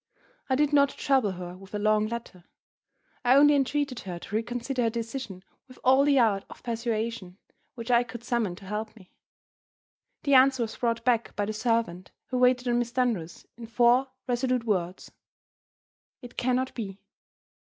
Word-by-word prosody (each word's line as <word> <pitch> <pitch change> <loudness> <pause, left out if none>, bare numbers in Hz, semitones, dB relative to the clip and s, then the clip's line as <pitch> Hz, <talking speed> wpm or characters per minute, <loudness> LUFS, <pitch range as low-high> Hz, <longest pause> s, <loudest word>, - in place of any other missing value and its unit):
I 260 - +3
did 295 +1 +1
not 280 -1 +5
trouble 265 -10 +1
her 180 0 -7
with 195 +2 -11
a - - 0
long 215 +1 +2
letter; 220 -6 -7 0.8
I 250 +1 +5
only 290 +1 +7
entreated 280 -2 0
her 180 -3 -6
to 200 - -7
reconsider 245 +3 -2
her 230 - +2
decision 230 -4 -6 0.2
with 255 - -15
all 265 +2 +5
the 285 -1 +4
art 210 -5 +3
of - - -13
persuasion 230 -5 -3 0.4
which 235 0 -5
I 240 0 +5
could 235 -1 -8
summon 235 -7 -1
to 195 +1 -14
help 215 +3 -5
me. 185 -5 -18 1.1
The 280 - +1
answer 260 -1 +5
was 220 -1 -5
brought 230 -1 -1
back 240 -2 +1
by 205 - -1
the 215 - -3
servant 220 -5 -1 0.2
who 255 - -1
waited 250 0 +3
on 240 0 +2
Miss 240 -1 -2
Dunross, 235 -10 -2
in 235 -1 -9
four 240 +3 +3 0.2
resolute 250 0 0
words: 185 -5 -2 1.1
"It 245 0 -11
can 250 0 +1
not 260 +1 -1
be." 200 -4 -6
235 Hz, 170 wpm, -27 LUFS, 210-255 Hz, 1.1 s, only